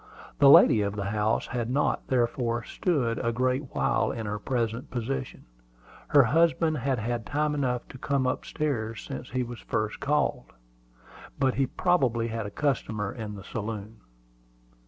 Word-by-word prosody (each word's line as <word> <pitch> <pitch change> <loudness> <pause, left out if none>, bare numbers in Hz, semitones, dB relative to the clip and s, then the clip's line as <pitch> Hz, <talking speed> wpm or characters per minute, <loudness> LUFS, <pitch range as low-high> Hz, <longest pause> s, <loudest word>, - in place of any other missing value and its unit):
The 140 - +7
lady 115 -5 +8
of 100 0 -1
the 100 -1 -3
house 105 +1 +1
had 120 -2 -3
not, 140 +4 0
therefore, 120 -1 0
stood 130 -11 -1
a 115 - +1
great 130 +3 -1
while - - +1
in 115 - -5
her 105 0 -3
present 115 0 -2
position. 130 +2 -4 0.6
Her 145 -2 +6
husband 160 +3 +2
had 130 +1 0
had 115 +1 -2
time 150 +3 0
enough 125 -4 -1
to 130 - -11
come 140 -1 0
up 125 - -1
stairs 115 -8 -3
since 130 -2 -6
he 130 0 -1
was 120 0 -7
first 110 0 -2
called, 150 +1 0 0.8
but 130 -2 +2
he 135 -1 +1
probably 125 -12 +1
had 115 -2 -3
a - - -5
customer 110 -5 -1
in 110 -3 -6
the 100 - -9
saloon. 105 0 -5
120 Hz, 160 wpm, -27 LUFS, 110-140 Hz, 0.8 s, lady